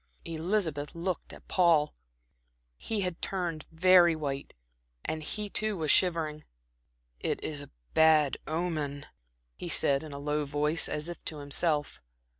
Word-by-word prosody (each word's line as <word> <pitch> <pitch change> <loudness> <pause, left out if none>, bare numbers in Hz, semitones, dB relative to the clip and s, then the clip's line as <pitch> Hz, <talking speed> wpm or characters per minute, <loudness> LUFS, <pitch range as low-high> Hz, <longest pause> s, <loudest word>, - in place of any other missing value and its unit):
Elizabeth 160 -3 -1
looked 175 +1 -3
at - - -13
Paul. 170 -5 +4 0.9
He 220 -2 -2
had 180 -3 -3
turned 175 -5 -3
very 175 0 +6
white, 140 -3 -4 0.5
and 155 - -2
he 210 +7 -4
too 215 0 -2
was 155 -3 +1
shivering. 160 -4 +1 0.8
"It - - -1
is 145 -2 -2
a 145 - -10 0.2
bad 155 -3 +5
omen," 155 -3 -2 0.5
he - - -5
said, 140 -1 +4
in 155 -1 -8
a 140 - -6
low 150 +1 -1
voice, 150 +3 0
as 150 +2 -2
if 175 - -7
to 155 - -4
himself. 145 - 0
160 Hz, 140 wpm, -30 LUFS, 150-175 Hz, 0.9 s, very